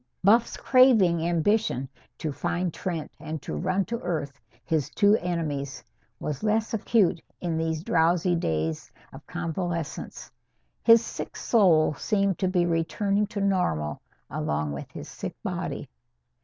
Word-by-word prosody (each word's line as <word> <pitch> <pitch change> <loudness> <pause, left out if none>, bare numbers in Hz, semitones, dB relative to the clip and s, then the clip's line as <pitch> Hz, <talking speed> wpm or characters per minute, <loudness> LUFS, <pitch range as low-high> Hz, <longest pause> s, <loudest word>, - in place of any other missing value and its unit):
Buff's 225 +5 +4
craving 225 -11 +5
ambition, 175 - +1 0.3
to 155 - -3
find 175 +4 -2
Trent 170 -4 -4
and 155 0 -5
to - - -5
run 185 +1 0
to 235 0 -3
earth 145 - -4 0.2
his 155 -4 0
two 205 0 +4
enemies, 145 -6 -3 0.4
was 150 -3 -4
less 220 +1 0
acute 210 -5 +2 0.2
in 170 -2 -2
these 160 -1 -1
drowsy 175 +1 +2
days 80 - -2 0.2
of - - -12
convalescence. 170 -2 -4 0.5
His 230 0 +6
sick - - -6
soul 175 -9 +4
seemed 200 +3 0
to 190 - +1
be 180 -1 +2
returning 195 +5 0
to 210 -1 -4
normal 180 - 0 0.3
along 75 0 -2
with 70 - -6
his - - -8
sick - - -6
body. - - -4
175 Hz, 135 wpm, -26 LUFS, 155-200 Hz, 0.5 s, His